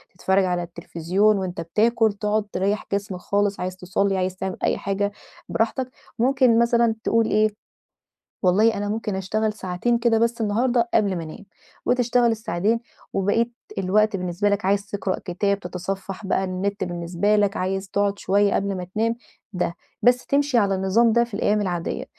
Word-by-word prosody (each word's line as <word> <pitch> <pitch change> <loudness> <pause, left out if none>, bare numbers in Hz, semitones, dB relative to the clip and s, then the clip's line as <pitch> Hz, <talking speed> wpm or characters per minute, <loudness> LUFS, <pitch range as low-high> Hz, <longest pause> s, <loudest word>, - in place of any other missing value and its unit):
تتفرّج 190 +1 +2
على 180 -1 -1
التليفزيون 175 +4 0
وأنت 185 -2 -3
بتاكل، 220 +5 +2
تقعد 210 +1 -1
تريح 200 +2 0
جسمك 200 -2 -2
خالص، 200 +2 0
عايز 185 0 -4
تصلي، 190 +2 0
عايز 185 0 -1
تعمل 190 -2 -4
أي - - +2
حاجة 200 +1 -1 0.4
براحتك. 250 +3 -1 0.3
ممكن 255 -1 +4
مثلًا 235 -1 +3
تقول 230 0 +2
إيه 215 +1 +3 0.9
والله 210 +5 +4
أنا 205 0 -2
ممكن 210 -2 -2
أشتغل 215 +3 -1
ساعتين 195 +5 -1
كده 235 -1 +2
بس 235 0 +1
النهارده 235 +3 +1
قبل 200 -4 +3
ما 165 - -4
انام. 160 +7 -10 0.4
وتشتغل 245 -1 +3
الساعتين 220 0 0 0.3
وبقية 225 +5 +1 0.3
الوقت 205 +3 +2
بالنسبة 180 +3 -1
لك 200 -1 0
عايز 200 +1 +1
تقرأ 200 -2 -2
كتاب، 200 +3 0
تتصفح 190 +2 -5
بقى 190 0 +1
النت 190 +2 -2
بالنسبة 175 +4 0
لك، 205 -1 +2
عايز 195 +1 -2
تقعد 200 0 0
شويّة 200 +1 +2
قبل 195 -1 -1
ما 180 - -4
تنام 230 +2 +1 0.4
ده. 180 -2 -1 0.3
بس 245 +1 +4
تمشي 280 -2 +2
على 200 -3 +3
النظام 195 +5 +3
ده 235 +1 +4
في 235 -2 -9
الأيّام 210 +1 +1
العاديّة، 175 -4 -3
200 Hz, 160 wpm, -23 LUFS, 185-225 Hz, 0.9 s, ممكن